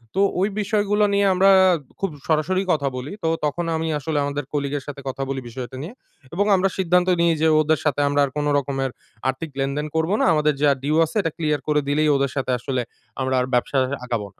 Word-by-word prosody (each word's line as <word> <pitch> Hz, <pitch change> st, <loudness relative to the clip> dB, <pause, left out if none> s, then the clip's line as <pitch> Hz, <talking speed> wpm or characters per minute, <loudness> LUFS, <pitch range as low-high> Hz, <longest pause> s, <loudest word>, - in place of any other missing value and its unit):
তো -, -, 0 dB, 0.2 s
ওই 200 Hz, -, +2 dB
বিষয়গুলো 210 Hz, 0 st, +1 dB
নিয়ে 200 Hz, 0 st, +3 dB
আমরা 190 Hz, +2 st, +4 dB, 0.5 s
খুব 195 Hz, -, -1 dB, 0.2 s
সরাসরি 165 Hz, +4 st, +1 dB
কথা 140 Hz, -3 st, 0 dB
বলি। 130 Hz, +4 st, -6 dB
তো -, -, +1 dB, 0.2 s
তখন 170 Hz, +4 st, -2 dB
আমি 160 Hz, 0 st, -2 dB
আসলে 155 Hz, +1 st, -3 dB
আমাদের 145 Hz, +1 st, -2 dB
কলিগের 140 Hz, -1 st, -2 dB
সাথে 140 Hz, -1 st, -7 dB
কথা 135 Hz, +1 st, -4 dB
বলি 135 Hz, -1 st, -3 dB
বিষয়টা 130 Hz, +2 st, -7 dB
নিয়ে, 175 Hz, +9 st, -7 dB, 0.4 s
এবং 200 Hz, +4 st, +1 dB
আমরা 190 Hz, +1 st, +2 dB
সিদ্ধান্ত 180 Hz, -1 st, +2 dB
নেই 170 Hz, -1 st, +4 dB
যে 160 Hz, -, +4 dB
ওদের 155 Hz, 0 st, +1 dB
সাথে 145 Hz, -1 st, +1 dB
আমরা 145 Hz, 0 st, +1 dB
আর 135 Hz, -, -7 dB
কোনো 145 Hz, 0 st, 0 dB
রকমের 135 Hz, -1 st, -2 dB, 0.4 s
আর্থিক 130 Hz, +5 st, -4 dB
লেনদেন 140 Hz, +3 st, -1 dB
করব 160 Hz, +3 st, +1 dB
না। -, -, +3 dB
আমাদের 150 Hz, -1 st, +2 dB
যা 145 Hz, -, +6 dB
ডিউ 150 Hz, +2 st, +1 dB
আছে 160 Hz, -, -11 dB
এটা 165 Hz, -4 st, -2 dB
ক্লিয়ার 150 Hz, -3 st, 0 dB
করে 150 Hz, -1 st, +2 dB
দিলেই 150 Hz, +1 st, +2 dB
ওদের 140 Hz, -1 st, 0 dB
সাথে 130 Hz, -1 st, -1 dB
আসলে 125 Hz, +1 st, -2 dB, 0.4 s
আমরা 130 Hz, 0 st, 0 dB
আর 125 Hz, -, +1 dB
ব্যবসা 125 Hz, +3 st, +1 dB, 0.3 s
আগাবো 115 Hz, -4 st, -3 dB
না। -, -, -35 dB
150 Hz, 215 wpm, -22 LUFS, 135-165 Hz, 0.5 s, যা